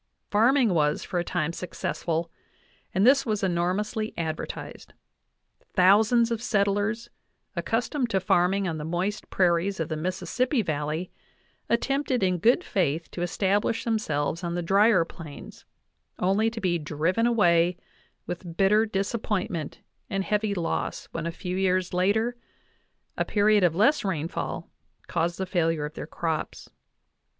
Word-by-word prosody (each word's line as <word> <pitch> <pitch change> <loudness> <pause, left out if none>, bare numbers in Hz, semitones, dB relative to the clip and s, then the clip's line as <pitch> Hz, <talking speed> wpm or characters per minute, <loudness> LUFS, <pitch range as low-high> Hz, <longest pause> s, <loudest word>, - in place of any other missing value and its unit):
Farming 230 +1 +4
was 150 -2 +1
for 180 - -2
a - - 0
time 165 -2 -2
successful, 170 -1 -3 0.6
and 190 +3 +2
this 270 +2 +6
was 215 -5 -2
enormously 190 +5 -1
advertised. 160 -2 -5 0.8
Thou 190 +3 +6
sands 235 +1 +2
of 230 -1 -1
settlers, 205 0 0 0.4
accustomed 240 +3 -1
to 195 - +1
farming 185 +2 +2
on 160 -2 -3
the - - -4
moist 180 +6 -2
prairies 180 +1 +1
of 160 - -2
the 160 - -2
Mississippi 225 - -1
Valley, 155 +1 -2 0.6
attempted 265 0 +1
in 180 -1 +1
good 240 - +4
faith 165 - -1
to 175 - -6
establish 200 +5 0
themselves 170 -8 -1
on 170 0 -2
the 175 - -2
drier 195 0 +4
Plains, 155 -4 -11 0.5
only 195 +5 +2
to 225 0 -7
be 175 -4 0
driven 165 +9 0
away 175 -6 +3 0.5
with 175 -1 -6
bitter 210 +3 +4
disappointment 195 -5 -2 0.3
and 195 0 -1
heavy 210 0 0
loss 170 -3 -3
when 165 0 -3
a - - -2
few 180 +2 -5
years 185 -1 +1
later 215 +7 +1 0.8
a - - +3
period 210 -1 +3
of 170 -2 +3
less 250 - +3
rainfall 165 -3 -3 0.4
caused 170 0 -1
the 190 - -2
failure 165 -4 0
of 150 - -7
their - - -7
crops. 160 -2 -4
185 Hz, 140 wpm, -26 LUFS, 170-215 Hz, 0.8 s, this